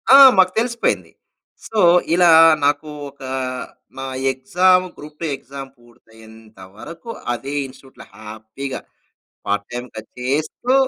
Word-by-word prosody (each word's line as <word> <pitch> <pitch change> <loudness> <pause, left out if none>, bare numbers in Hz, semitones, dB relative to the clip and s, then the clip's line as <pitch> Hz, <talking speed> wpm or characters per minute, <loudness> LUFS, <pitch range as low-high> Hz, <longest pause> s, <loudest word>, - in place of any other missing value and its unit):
ఆ! - - +10 0.2
మాకు 185 -1 +5
తెలిసిపోయింది. 235 0 -1 0.6
సో, 220 - -3 0.3
ఇలా 175 -1 +5 0.3
నాకు 145 +2 0 0.2
ఒక 140 0 -22 0.8
నా 135 - -5 0.3
ఎక్సామ్ 180 +8 +2
గ్రూప్ 150 0 -12
2 165 - -1
ఎక్సామ్ 135 0 -10
పూర్తయ్యేంత 110 -2 -19 0.2
వరకు 170 - -11 0.2
అదే 135 +4 -6
ఇన్‌స్ట్‌ట్యూట్‌లో 130 0 -16
హ్యాపీగా 110 +5 -7 0.7
పార్ట్ 100 0 -1
టైమ్‌గా 120 -2 -7 0.2
చేస్తూ 155 - -1
135 Hz, 110 wpm, -19 LUFS, 115-170 Hz, 0.8 s, ఆ